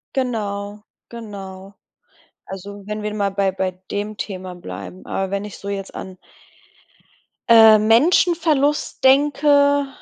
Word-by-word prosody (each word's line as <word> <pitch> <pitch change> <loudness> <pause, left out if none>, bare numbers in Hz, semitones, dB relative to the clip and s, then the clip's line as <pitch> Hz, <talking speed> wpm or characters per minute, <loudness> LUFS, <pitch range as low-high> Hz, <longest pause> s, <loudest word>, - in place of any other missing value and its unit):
Genau, 210 -5 -3 0.3
genau. 195 -4 -9 0.7
Also, 200 +1 -9
wenn 210 0 -5
wir 210 - -3
mal 200 -2 0
bei 195 0 0
bei 190 0 -2 0.2
dem 205 +1 -4
Thema 185 -2 -6
bleiben. 95 - -9
Aber 195 -1 -3
wenn 200 +1 -2
ich 210 - -9
so 200 - -7
jetzt 195 -1 -5
an 185 -1 -8 1.3
äh, 220 -2 +8
Menschenverlust 295 - +2
denke, 285 +1 +4
205 Hz, 120 wpm, -20 LUFS, 195-260 Hz, 1.3 s, äh